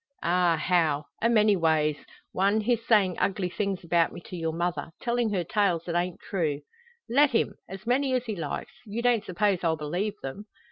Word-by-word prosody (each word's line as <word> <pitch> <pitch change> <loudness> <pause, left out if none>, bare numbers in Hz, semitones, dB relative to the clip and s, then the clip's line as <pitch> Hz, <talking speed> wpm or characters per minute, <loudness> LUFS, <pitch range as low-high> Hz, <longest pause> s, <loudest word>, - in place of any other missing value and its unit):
"Ah, 175 -1 +3
how! 155 -3 +1 0.2
A 230 - +3
many 215 -3 +4
ways. 160 -3 +2 0.4
One, 200 +3 +2
his 230 +1 0
sayin' 200 -6 +4
ugly 190 -2 0
things 200 -2 -2
about 170 0 +2
me - - -8
to 180 - -9
your 165 -2 -2
mother 170 +1 -2
tellin' 240 -2 0
her 185 -4 0
tales 180 -2 +1
that 170 - -3
ain't 175 +1 -1
true." 155 -7 -2 0.5
"Let 285 +5 +4
him 235 - +1 0.2
as 195 +2 -8
many 260 +2 +2
as 250 -1 -1
he 220 -3 -3
likes; 160 -5 -5
you 220 +3 -4
don't 240 -3 +3
suppose 195 0 +1
I'll 160 -1 +1
believe 175 +8 -2
them?" 200 +11 -6
185 Hz, 190 wpm, -27 LUFS, 170-215 Hz, 0.5 s, many